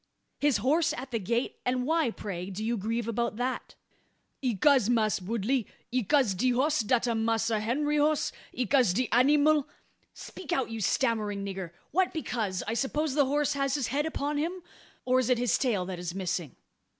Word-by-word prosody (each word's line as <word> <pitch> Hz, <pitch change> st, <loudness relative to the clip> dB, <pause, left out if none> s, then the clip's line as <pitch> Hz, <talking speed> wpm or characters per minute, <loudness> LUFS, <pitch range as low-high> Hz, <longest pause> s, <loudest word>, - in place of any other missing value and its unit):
"His 285 Hz, -5 st, +3 dB
horse 295 Hz, +10 st, +2 dB
at 260 Hz, +1 st, -7 dB
the 230 Hz, -, 0 dB
gate? 235 Hz, +6 st, -2 dB
And 250 Hz, 0 st, 0 dB
why, 320 Hz, -2 st, +2 dB
pray, 190 Hz, -4 st, -5 dB
do 205 Hz, +3 st, -5 dB
you 235 Hz, +1 st, 0 dB
grieve 225 Hz, +2 st, -2 dB
about 235 Hz, -1 st, -1 dB
that?" 250 Hz, +3 st, -3 dB, 0.7 s
"'Ecause, 250 Hz, 0 st, +3 dB
Mass' 215 Hz, -4 st, +2 dB
Woodley, 230 Hz, +5 st, -1 dB, 0.2 s
'ecause 255 Hz, -1 st, +2 dB
de 250 Hz, +8 st, +1 dB
hoss 290 Hz, +5 st, +2 dB
dat 235 Hz, +2 st, +1 dB
am 225 Hz, -2 st, 0 dB
Massa 225 Hz, -1 st, +1 dB
Henry 295 Hz, +7 st, 0 dB
hoss 300 Hz, 0 st, +2 dB, 0.2 s
'ecause 250 Hz, -5 st, +2 dB
de 250 Hz, +5 st, 0 dB
anymal 290 Hz, +3 st, +4 dB, 0.3 s
" -, -, -42 dB
"Speak 330 Hz, -, -8 dB
out, 260 Hz, -3 st, 0 dB
you 225 Hz, -1 st, -4 dB
stammering 210 Hz, -2 st, 0 dB
nigger! 190 Hz, -3 st, -5 dB, 0.2 s
What 370 Hz, +4 st, +1 dB
because? 220 Hz, -, -2 dB
I 225 Hz, -, -1 dB
suppose 280 Hz, +4 st, -1 dB
the 285 Hz, 0 st, +3 dB
horse 290 Hz, +2 st, +1 dB
has 275 Hz, -1 st, 0 dB
his 275 Hz, -6 st, -1 dB
head 290 Hz, +5 st, 0 dB
upon 290 Hz, -1 st, -2 dB
him? 350 Hz, +4 st, -3 dB, 0.4 s
Or 255 Hz, 0 st, +3 dB
is 255 Hz, -1 st, 0 dB
it 250 Hz, -, +4 dB
his 245 Hz, 0 st, +2 dB
tail 215 Hz, -9 st, +1 dB
that 180 Hz, -1 st, -5 dB
is 175 Hz, 0 st, -5 dB
missing?" 175 Hz, -6 st, -3 dB
245 Hz, 185 wpm, -29 LUFS, 215-280 Hz, 0.7 s, anymal